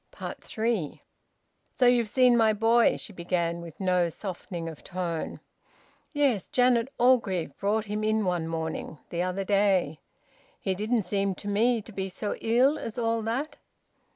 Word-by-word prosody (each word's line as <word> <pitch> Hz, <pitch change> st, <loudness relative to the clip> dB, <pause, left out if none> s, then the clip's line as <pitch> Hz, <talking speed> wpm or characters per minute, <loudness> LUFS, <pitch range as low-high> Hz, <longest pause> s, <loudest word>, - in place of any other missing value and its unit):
THREE. 220 Hz, -9 st, -2 dB, 0.7 s
"So 255 Hz, -, +1 dB
you've 240 Hz, -3 st, +4 dB
seen 250 Hz, +1 st, +5 dB
my 220 Hz, -2 st, +4 dB
boy?" 225 Hz, +2 st, +3 dB
she 210 Hz, -, -8 dB
began, 170 Hz, -1 st, -1 dB
with 170 Hz, -3 st, -11 dB
no 180 Hz, -2 st, +2 dB
softening 180 Hz, -1 st, -6 dB
of 160 Hz, -3 st, -9 dB
tone. 175 Hz, -3 st, -4 dB, 0.7 s
"Yes, 280 Hz, -, +1 dB
Janet 245 Hz, 0 st, +2 dB
Orgreave 200 Hz, -, +2 dB
brought 210 Hz, +2 st, 0 dB
him 210 Hz, +1 st, -3 dB
in 215 Hz, -1 st, +1 dB
one 175 Hz, -3 st, 0 dB
morning 160 Hz, -1 st, -4 dB
the 170 Hz, -, -1 dB
other 185 Hz, +2 st, -1 dB
day. 195 Hz, -6 st, +2 dB, 0.6 s
He 190 Hz, -, -1 dB
didn't 215 Hz, +4 st, 0 dB
seem 195 Hz, 0 st, -1 dB
to 205 Hz, -, -9 dB
me 225 Hz, +3 st, +2 dB
to 225 Hz, -, -12 dB
be 195 Hz, -1 st, -4 dB
so 205 Hz, +3 st, -3 dB
ill 255 Hz, +6 st, +3 dB
as 225 Hz, -, -6 dB
all 230 Hz, -1 st, 0 dB
that." 240 Hz, +8 st, -3 dB
205 Hz, 155 wpm, -27 LUFS, 180-230 Hz, 0.7 s, seen